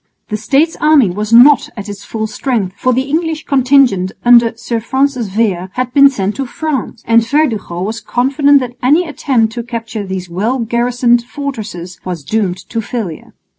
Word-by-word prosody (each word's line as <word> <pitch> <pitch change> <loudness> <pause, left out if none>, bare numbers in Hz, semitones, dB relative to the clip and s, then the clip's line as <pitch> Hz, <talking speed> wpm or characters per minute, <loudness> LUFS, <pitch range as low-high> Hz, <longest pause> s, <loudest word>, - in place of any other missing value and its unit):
The 215 - -2
States 280 +9 +1
army 300 - +4
was 210 +4 -4
not 245 +3 +6
at 205 - -6
its 205 -1 -8
full 220 -1 -4
strength, 215 -3 -2
for 255 - 0
the 255 +1 +1
English 315 +2 -2
contingent 255 -8 +3
under 235 -1 +5
Sir 230 0 -3
Francis 260 0 -1
Vere 190 -3 -1
had 250 0 -3
been 280 -1 +7
sent 205 -6 -3
to 270 -2 -3
France; 275 -5 -4
and 230 0 +4
Verdugo 230 - -1
was 220 +4 -4
confident 280 +3 +2
that 245 -1 -6
any 305 +8 +3
attempt 245 -7 0
to 240 - -4
capture 230 -2 -5
these 190 -2 -5
well 205 +9 -1
garrisoned 240 0 +1
fortresses 220 - -7
was 175 -5 -5
doomed 190 +2 -1
to 230 - -2
failure. 210 -8 -6
235 Hz, 170 wpm, -14 LUFS, 210-270 Hz, -, been